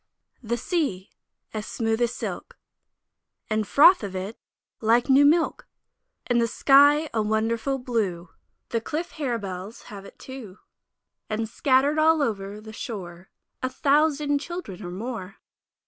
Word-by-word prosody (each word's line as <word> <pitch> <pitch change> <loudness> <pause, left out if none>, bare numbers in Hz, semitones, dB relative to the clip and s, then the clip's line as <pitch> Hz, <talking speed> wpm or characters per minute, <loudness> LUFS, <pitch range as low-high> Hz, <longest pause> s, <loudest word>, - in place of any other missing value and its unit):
THE 235 0 -2
Sea! 235 - -2 0.4
as 215 -1 -4
smooth 225 0 -1
as 240 -1 +2
silk, - - -6 0.9
And 215 0 +2
the 210 - -5
froth 345 +6 +6
of 200 -3 -6
it 190 +4 -4 0.4
like 235 +4 +2
new 275 +2 +7
milk, 325 +4 +2 0.6
And 240 -1 +2
the 230 - +2
sky 285 +5 +5
a 225 - +1
wonderful 225 +5 0
blue, 210 -9 -2 0.4
The 230 - -1
cliff 315 +8 -4
harebells 215 -7 -4
have 200 -2 -9
it - - -14
too, 245 -8 -10 0.7
And 220 +1 -2
scatter'd 275 +5 +2
all 315 -1 +4
over 205 -4 -3
the 220 0 -11
shore 185 -6 -7 0.3
A 255 - -1
thousand 290 +1 +2
Children 295 - -7
or 175 - -5
more! 195 0 -6
230 Hz, 140 wpm, -25 LUFS, 210-280 Hz, 0.9 s, new